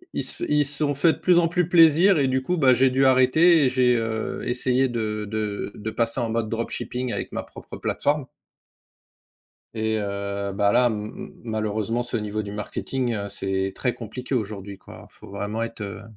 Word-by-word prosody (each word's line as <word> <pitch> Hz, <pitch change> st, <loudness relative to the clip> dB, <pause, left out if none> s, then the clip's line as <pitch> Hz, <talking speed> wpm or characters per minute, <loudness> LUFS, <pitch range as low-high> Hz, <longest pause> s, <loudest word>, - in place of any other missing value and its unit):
Ils -, -, -1 dB
se -, -, -1 dB
f -, -, -6 dB
ils 150 Hz, 0 st, +3 dB
se 145 Hz, +1 st, +1 dB
sont 145 Hz, -, 0 dB
fait 160 Hz, +4 st, +4 dB
de -, -, -9 dB
plus 180 Hz, -1 st, +4 dB
en 170 Hz, -, +3 dB
plus 175 Hz, 0 st, 0 dB
plaisir 170 Hz, +2 st, +6 dB
et 135 Hz, -, +2 dB
du 130 Hz, 0 st, 0 dB
coup, 180 Hz, +7 st, 0 dB
bah 135 Hz, -5 st, +5 dB
j'ai 130 Hz, +1 st, +3 dB
dû 135 Hz, +1 st, +2 dB
arrêter 140 Hz, +5 st, +5 dB
et -, -, +3 dB
j'ai, 125 Hz, -1 st, +3 dB
heu, 115 Hz, -1 st, -3 dB
essayé 125 Hz, +1 st, +1 dB
de 110 Hz, -3 st, -3 dB
de 105 Hz, -1 st, -3 dB
de 110 Hz, -, -5 dB
passer 115 Hz, +2 st, 0 dB
en 115 Hz, -, -1 dB
mode 110 Hz, -1 st, -1 dB
dropshipping 120 Hz, +2 st, -3 dB
avec -, -, -4 dB
ma -, -, -2 dB
propre -, -, -11 dB
plateforme 145 Hz, -2 st, -1 dB, 1.5 s
et 110 Hz, 0 st, -1 dB
heu, 100 Hz, -1 st, -3 dB
bah 100 Hz, +1 st, +2 dB
là, 125 Hz, +1 st, +4 dB
ma 105 Hz, -1 st, -4 dB, 0.3 s
malheureusement 110 Hz, +1 st, -2 dB
ce 120 Hz, 0 st, -3 dB
niveau 105 Hz, 0 st, -3 dB
du 100 Hz, -1 st, -7 dB
marketing, 120 Hz, +4 st, -3 dB
heu, 100 Hz, -1 st, -4 dB
c'est 95 Hz, 0 st, -2 dB
très 125 Hz, -, -1 dB
compliqué 125 Hz, +3 st, -6 dB
aujourd'hui 100 Hz, -4 st, -4 dB
quoi. -, -, -13 dB
Faut -, -, -13 dB
vraiment 105 Hz, +3 st, -4 dB
être, 115 Hz, -1 st, -6 dB
heu, 100 Hz, 0 st, -6 dB
115 Hz, 200 wpm, -24 LUFS, 105-130 Hz, 1.5 s, plaisir